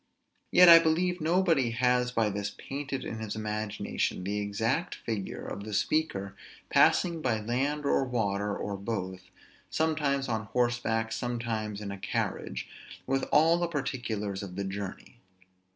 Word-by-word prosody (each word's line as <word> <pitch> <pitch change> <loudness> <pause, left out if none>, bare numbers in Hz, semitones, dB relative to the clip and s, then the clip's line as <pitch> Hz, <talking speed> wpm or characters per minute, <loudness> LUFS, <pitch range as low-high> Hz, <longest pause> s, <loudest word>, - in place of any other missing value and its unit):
Yet 180 - +7
I 165 -1 +11
believe 175 +2 +1
nobody 165 -6 +3
has 125 +1 +2
by 115 -3 +1
this 100 +1 -2
painted 135 +4 -5
in 110 - -5
his 110 -1 -4
imagination 105 -3 -2
the 100 +2 -2
exact 110 - -1
figure 105 -4 -5
of 100 - -5
the 105 -1 -4
speaker 100 -13 0 0.4
passing 170 -3 +4
by 120 -6 +1
land 135 +7 -1
or 140 - +3
by 130 - -6
water, 100 -3 0
or 100 -1 -4
both; 95 -3 -5 0.4
sometimes 150 -4 0
on 110 -2 -2
horseback, 115 -1 0
sometimes 115 -4 -3
in 100 -1 -5
a 100 - -7
carriage: 100 - -3 0.4
with 135 0 0
all 165 +3 +5
the 175 - +1
particulars 120 - -3
of 95 -3 -7
the 100 - -2
journey. 95 0 -6
115 Hz, 150 wpm, -29 LUFS, 105-140 Hz, 0.4 s, I